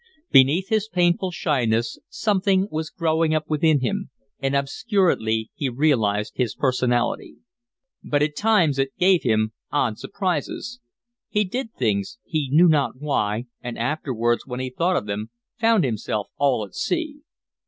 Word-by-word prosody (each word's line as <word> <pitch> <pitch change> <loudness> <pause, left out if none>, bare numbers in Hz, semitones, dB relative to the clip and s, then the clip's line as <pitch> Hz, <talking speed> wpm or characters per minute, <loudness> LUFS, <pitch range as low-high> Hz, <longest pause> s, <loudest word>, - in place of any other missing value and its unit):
Beneath 150 +10 +5
his 220 -2 +1
painful 180 0 +1
shyness 120 -9 0
something 195 -2 +1
was 155 0 -3
growing 160 -2 +1
up 155 0 -1
within 155 -2 +2
him, 200 +8 -2 0.3
and 135 0 -1
obscurely 140 - 0
he 140 - -2
realised 115 -6 +1
his 125 -3 -1
personality. 125 -2 0 0.7
But 145 0 +1
at 150 0 -1
times 175 -9 +2
it 135 0 -1
gave 185 -1 +4
him 110 -2 +1 0.2
odd 120 -7 0
surprises; 195 - -3 0.5
he 210 - +2
did 225 +4 -4
things, 105 - -1
he 155 -5 -2
knew 165 +5 +6
not 145 -5 +1
why, 115 -6 -1 0.2
and 120 -1 -6
afterwards 120 -3 -1
when 125 -1 -5
he 130 0 -3
thought 175 +7 +1
of - - -2
them 105 +2 -4 0.3
found 225 -4 +4
himself 110 -3 -2
all 135 -6 +2
at 95 - -18
sea. 310 -4 -2
145 Hz, 145 wpm, -23 LUFS, 120-180 Hz, 0.7 s, knew